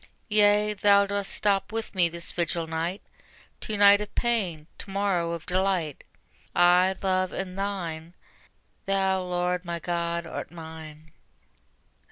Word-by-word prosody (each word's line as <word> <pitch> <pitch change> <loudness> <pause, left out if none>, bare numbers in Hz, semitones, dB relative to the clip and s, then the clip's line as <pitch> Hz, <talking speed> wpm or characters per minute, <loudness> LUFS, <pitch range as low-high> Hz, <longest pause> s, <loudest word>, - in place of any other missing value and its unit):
Yea, 210 0 +4
Thou 200 0 +4
dost 200 0 -2
stop 200 -1 +1
with 225 0 -4
me 175 -3 +3
this 170 0 -6
vigil 170 -1 -1
night; 165 +4 -3 0.6
To 215 - -3
night 205 0 +7
of 210 - -7
pain, 195 -11 -1
to - - -8
morrow 190 -4 0
of 165 -1 -6
delight: 180 -5 -1 0.5
I, 180 +2 +5
Love, 185 -1 +1
am 190 -1 -4
Thine; 180 -4 -4 0.7
Thou, 190 -1 +1
Lord, 180 0 -1
my 170 -1 -4
God, 170 0 -2
art - - -6
mine. 160 -2 -11
185 Hz, 135 wpm, -26 LUFS, 170-200 Hz, 0.7 s, night